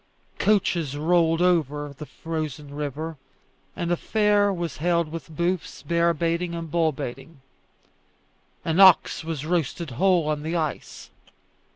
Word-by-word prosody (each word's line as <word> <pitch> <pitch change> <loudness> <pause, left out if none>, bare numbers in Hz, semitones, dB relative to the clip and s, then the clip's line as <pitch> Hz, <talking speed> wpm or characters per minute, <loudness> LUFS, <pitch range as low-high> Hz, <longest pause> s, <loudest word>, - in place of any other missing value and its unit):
Coaches 170 -8 +1
rolled 165 +1 +2
over 150 -5 +1
the 150 +2 -9
frozen 155 -3 -5
river, 150 +2 -4 0.6
and 175 -2 -2
a - - +4
fair 205 +1 +2
was 170 -4 -4
held 170 0 0
with 165 0 -7
booths, 170 +3 -2
bear 170 0 +2
baiting, 170 +2 -1
and 165 -2 -6
bull 165 -2 +2
baiting. 135 +3 -8 1.3
An 165 +2 0
ox 190 -3 +6
was 160 -3 -4
roasted 165 -2 -1
whole 175 +4 +2
on 150 -1 -1
the 160 +3 -3
ice. 155 -3 -4
165 Hz, 135 wpm, -24 LUFS, 150-175 Hz, 1.3 s, ox